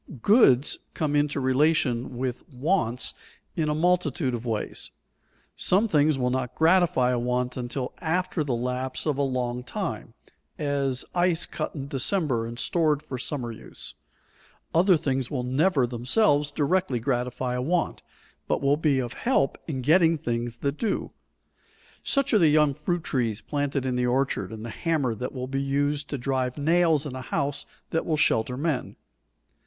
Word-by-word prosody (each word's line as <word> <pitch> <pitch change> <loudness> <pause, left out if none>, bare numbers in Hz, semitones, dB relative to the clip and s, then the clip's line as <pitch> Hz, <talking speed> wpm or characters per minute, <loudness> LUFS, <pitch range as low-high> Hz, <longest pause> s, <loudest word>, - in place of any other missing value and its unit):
_ 125 - -12
Goods 150 - +5 0.2
come 150 -2 0
into 145 -1 +1
relation 130 -2 +1
with 125 -1 -3
wants 130 -3 0 0.4
in 155 -2 0
a 150 - 0
multitude 160 -5 +1
of 120 0 -4
ways. 110 -2 -3 0.7
Some 200 +5 +3
things 150 -5 +3
will 125 -1 0
not 130 -1 -2
gratify 160 -7 +3
a 125 - +1
want 125 +1 -1
until 125 +1 -4
after 180 0 0
the 135 -4 -1
lapse 125 +2 -3
of 145 -3 0
a - - +3
long 125 -2 -1
time, - - -5 0.4
as 140 -3 -1
ice 175 -1 +2
cut - - -5
in 140 -2 -5
December 135 - 0
and 120 0 -7
stored 155 +1 +1
for 130 - -6
summer 120 -2 -3
use. 110 - -8 0.8
Other 180 +2 +5
things 135 -4 -1
will 130 -4 -2
never 135 +2 +2
themselves 145 - +2
directly 145 -2 0
gratify 125 0 -1
a 125 - -1
want, 170 +6 0 0.5
but - - +1
will 140 +1 +2
be 150 -3 +2
of 125 -2 -2
help 235 - +1
in 130 -5 -3
getting 165 +3 +4
things 120 -5 -3
that 140 +1 -1
do; 220 -4 -1 0.9
such 275 -3 +1
are 215 - +6
the 165 - +5
young 150 -1 +4
fruit 165 +4 -2
trees 115 -7 -1
planted 145 0 -2
in 130 -1 0
the 125 0 +1
orchard, 125 -6 0
and 110 0 -7
the 120 - -5
hammer 155 -7 0
that 125 +4 -4
will 130 -1 -4
be 135 +1 -2
used 145 +1 0
to 140 - -2
drive 130 0 -1
nails 160 0 +3
in 135 -3 -5
a 130 - -5
house 140 +2 -2 0.2
that 165 - 0
will 155 -2 0
shelter 125 -3 +2
men. 150 -2 -2
140 Hz, 170 wpm, -26 LUFS, 125-155 Hz, 0.9 s, are